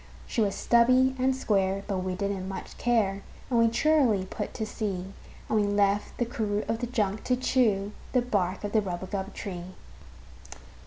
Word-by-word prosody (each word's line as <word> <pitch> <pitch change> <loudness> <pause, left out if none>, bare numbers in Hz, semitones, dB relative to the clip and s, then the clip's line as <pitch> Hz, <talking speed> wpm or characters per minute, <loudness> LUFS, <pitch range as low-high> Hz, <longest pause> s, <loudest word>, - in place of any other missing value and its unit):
She 230 - -1
was 200 -2 +1
stubby 255 +2 +4
and 260 +1 +2
square, 195 -5 +1
but 195 -3 -2
we 185 0 -2
didn't 200 -1 -2
much 190 - -7
care, 210 -5 +1 0.3
And 235 - +3
we 230 - +5
cheerily 235 -6 +3
put - - -5
to 220 - -2
sea; 195 -4 -4 0.3
And 220 - +2
we 205 - +1
left 205 0 +1
the 240 - +1
crew 215 -3 -2
of 225 0 -1
the 245 - -2
junk 215 -4 -1
to 255 - +2
chew 220 -6 +1 0.2
The 250 -2 +3
bark 190 -6 -1
of 205 - -3
the 220 - +3
rubagub 190 +1 -4
tree. 185 -2 -6
205 Hz, 175 wpm, -28 LUFS, 195-235 Hz, 0.3 s, we